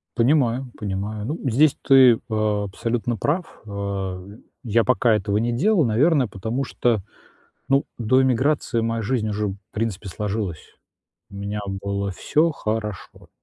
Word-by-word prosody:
Понимаю, 125 0 +2
понимаю. 105 +1 -4
Ну, 150 +8 -3
здесь 140 +5 +4
ты, 130 -4 +6
э, 110 -1 0
абсолютно 115 +4 -2
прав. 160 - -2
Э, 100 -2 -4 0.4
я 115 -1 +2
пока 125 -2 +3
этого 105 -1 0
не 120 +2 0
делал, 175 - +3
наверное, 130 +4 +3
потому 110 +7 -3
что, 120 -3 +1 0.7
ну, 135 +1 +2
до 125 +3 +3
эмиграции 130 -1 +1
моя 115 0 -1
жизнь 110 0 -1
уже 105 0 -1
в 95 - -4 0.2
принципе 110 -2 -3
сложилась. 100 -3 -4 0.6
У - - -13
меня 100 +1 -4
было 100 0 -3
всё 155 - +1
хорошо. 105 -6 -5
115 Hz, 140 wpm, -23 LUFS, 100-130 Hz, 0.7 s, ты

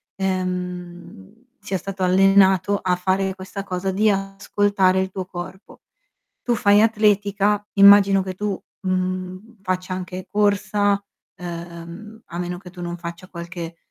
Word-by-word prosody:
ehm, 180 - -5
sia 190 - -3
stato 190 +2 -5
allenato 195 +1 +4
a 180 -2 0
fare 190 +1 0
questa 195 +1 -7
cosa 190 0 -3
di 210 +3 +2
ascoltare 195 -1 +1
il 190 - -2
tuo 185 -1 -5
corpo. 185 +2 -9 0.6
Tu 240 - +1
fai 205 -1 +4
atletica, 210 -2 +2
immagino 200 -1 +7
che 185 -1 -5
tu, 205 0 -3 0.2
mhmm, 185 +3 -3
faccia 185 -1 -2
anche 185 0 -6
corsa, 205 -1 +1 0.3
ehm, 170 +5 -9
a 170 - -7
meno 180 0 -3
che 180 0 -12
tu 180 0 -12
non 175 0 -4
faccia 170 +1 -8
qualche, 170 -1 -7
190 Hz, 135 wpm, -22 LUFS, 180-200 Hz, 0.6 s, immagino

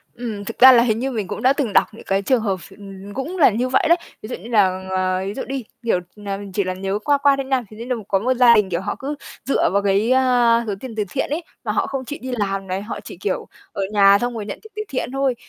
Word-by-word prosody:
Ừm, 220 -4 -5
thực 230 - -6
ra 260 +1 +10
là 240 -2 +6
hình 225 -2 +1
như 265 +2 -2
mình 215 -6 -3
cũng - - -5
đã 260 +2 +4
từng 265 -7 -2
đọc - - +5
những 220 - -12
cái 195 0 +1
trường 245 +4 +2
hợp 200 -3 0
ph 185 - -14 0.4
cũng 275 - -4
là 315 - +6
như 240 +4 -1
vậy 260 - +2
đấy. 340 - +6 0.2
Ví 215 - -8
dụ - - -3
như 215 +7 -11
là, 190 -5 +2
ờ, 185 0 0
ví 200 - -3
dụ 260 - -4
đi, 270 -1 -4 0.2
kiểu 225 -6 +2 0.2
là, 200 -2 -5
chỉ 200 - +1
là 185 0 -2
nhớ 195 +2 -3
qua 290 -1 +4
qua 280 0 +4
thôi 275 -1 -3
nha, 265 -2 0
thì 215 - -13
đấy 230 - -7
là 250 - 0
có 195 - +2
một 255 +5 +1
gia 245 -2 +6
đình, 210 -3 +2
kiểu, 170 0 -1
họ 205 +1 -3
cứ 285 +2 -4 0.3
dựa 275 - +2
vào 200 - +3
cái, 200 +4 +2
ơ, 245 -3 +4
số 205 - -1
tiền 250 -2 -8
từ 215 - 0
thiện 270 - -2
ấy, 315 +4 -2 0.2
mà - - -1
họ - - 0
không 270 -1 -4
chịu 295 +4 -6
đi 260 +1 -5
làm 195 -2 -2
này, 185 +1 -2
họ 210 - -6
chỉ, - - -9
kiểu, - - -3 0.2
ở - - -4
nhà 200 -1 +6
xong 245 0 -1
rồi 215 - -4
nhận 200 - -6
tiền 440 - -15
từ 425 - -3
thiện 260 - -2
thôi. 270 -2 0
230 Hz, 295 wpm, -21 LUFS, 200-260 Hz, 0.4 s, ra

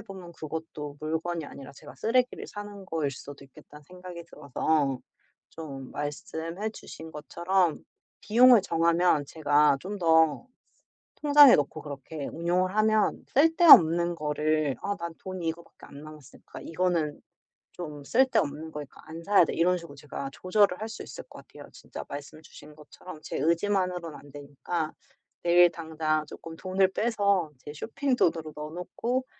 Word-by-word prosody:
생각해 - - -10
보면 185 -3 -10
그것도 155 -2 -7
'물건이 160 +2 -3
아니라 140 -1 -10
제가 145 +1 -13
쓰레기를 250 +2 0
사는 205 -1 -9
거일 160 -6 -2
수도 140 +1 -11
있겠다.'는 150 +2 -16
생각이 180 +1 -10
들어서 145 -2 -1 0.5
좀 135 -5 -9
말씀해 160 +7 -5
주신 160 -6 -11
것처럼 175 +3 0 0.5
비용을 235 +2 +6
정하면 170 -2 +2
제가 145 -1 +3
좀 200 +5 -6
더 160 +3 +3 0.8
통장에 290 -3 +8
넣고 145 +2 -2
그렇게 145 +1 -7
운용을 180 +3 0
하면 215 0 +2
쓸데없는 220 - +7
거를 150 -2 0
'아 200 0 -3
난 170 0 -6
돈이 185 -3 -5
이거밖에 165 +1 -7
안 140 +1 -12
남았을까. 155 -2 -13
이거는 165 -3 -1 0.5
좀 150 -4 -8
쓸 255 - +4
데 - - +2
없는 150 +2 -4
거니까 150 -2 -9
안 165 +1 -9
사야 200 -2 +5
돼.' - - -4
이런 180 +2 +2
식으로 170 -5 -11
제가 140 -1 -7
조절을 185 +3 +2
할 220 - -4
수 220 - -8
있을 - - -9
것 - - -13
같아요. - - -13
진짜 - - -9
말씀 145 +2 -8
주신 150 -1 -15
것처럼 155 +2 -12
제 - - -5
의지만으로는 180 -1 0
안 145 - -16
되니까 145 +3 -4 0.5
내일 175 0 +6
당장 160 -2 -2
조금 165 +2 -10
돈을 190 +1 +1
빼서 200 -6 0
제 145 - -9
쇼핑 260 - -2
돈으로 160 -6 +1
넣어 150 0 -7
놓고 235 +9 -3
165 Hz, 325 characters per minute, -27 LUFS, 150-185 Hz, 0.8 s, 통장에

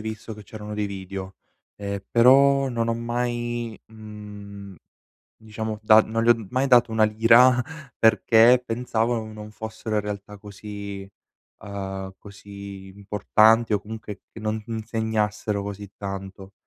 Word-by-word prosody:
visto 110 0 -6
che 105 - -11
c'erano 105 +1 -8
dei 105 0 -1
video, 95 -1 -7 0.4
ehm, 100 -1 -4
però 135 +3 +5
non 115 -2 -1
ho 115 - +1
mai, 120 -1 -3
mhmm, 105 -2 -11 0.6
diciamo, 110 -1 -6
da 110 0 +7
non 115 +1 -1
li 120 - +5
ho 115 -3 +2
mai 130 +4 0
dato 125 -3 +5
una 110 -1 +4
lira 115 +4 +5 0.4
perché 115 +2 +5
pensavo 115 0 -1
non 110 -1 -6
non 105 0 -9
fossero 110 0 -5
in - - +3
realtà 105 0 -7
così 100 -1 -8 0.5
uhm, 95 -1 -6
così 100 -1 -11
importanti 110 +2 +3
o 100 - 0
comunque 105 -1 -8
che 115 - -10
non 110 0 -2
insegnassero 110 -2 -2
così 100 0 -7
tanto. 95 -1 -7
110 Hz, 135 wpm, -24 LUFS, 100-115 Hz, 0.6 s, da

